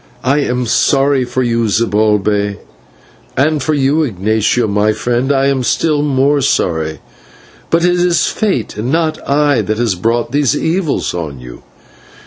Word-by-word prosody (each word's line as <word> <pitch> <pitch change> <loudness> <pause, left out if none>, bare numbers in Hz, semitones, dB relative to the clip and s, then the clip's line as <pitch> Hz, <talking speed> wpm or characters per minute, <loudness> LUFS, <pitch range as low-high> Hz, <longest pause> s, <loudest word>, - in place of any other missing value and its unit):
I 135 +3 +2
am 125 -3 -1
sorry 135 +3 +2
for 130 +1 -2
you, 115 -1 0
Zibalbay; 105 -1 +1 0.8
and 150 +1 +1
for 155 +3 0
you, 145 +3 +1
Ignatio, 110 - 0
my 105 +1 +1
friend, 120 +4 -1
I 135 -1 +2
am 135 -1 +1
still 150 +4 0
more 140 0 +1
sorry: 80 - -1 0.7
but 170 +1 +2
it 180 0 +2
is 175 -1 +2
fate 190 - -2
and 115 +5 -2
not 160 -1 0
I 145 -1 +2
that 110 0 -2
has 115 -3 0
brought 115 +6 -1
these 145 0 +1
evils 165 0 -1
on 75 -6 -5
you. 60 -1 -11
125 Hz, 150 wpm, -14 LUFS, 110-145 Hz, 0.8 s, I